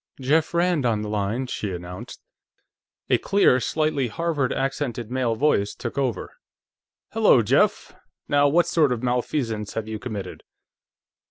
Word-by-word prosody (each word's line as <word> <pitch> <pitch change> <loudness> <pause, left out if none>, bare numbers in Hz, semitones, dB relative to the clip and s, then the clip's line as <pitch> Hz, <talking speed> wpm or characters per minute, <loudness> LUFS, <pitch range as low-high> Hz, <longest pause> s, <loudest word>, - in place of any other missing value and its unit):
"Jeff 155 +5 +1
Rand 170 -3 +2
on 110 -3 0
the 105 - -5
line," 105 +5 -1
she 105 -5 -4
announced. 90 0 -8 0.9
A - - +4
clear, 195 -10 +3
slightly 155 -1 0
Harvard 155 -1 -1
accented 130 -4 -3
male 125 -3 0
voice 110 -6 +1
took 120 - -6
over. 135 -4 -2 0.7
"Hello, - - +4
Jeff. - - +1 0.3
Now 145 0 +4
what 170 +5 +3
sort 155 -5 +2
of 125 -1 -2
malfeasance 120 -3 -2
have 110 -1 -3
you 110 -1 -5
committed?" 110 -5 -6
125 Hz, 140 wpm, -24 LUFS, 110-145 Hz, 0.9 s, A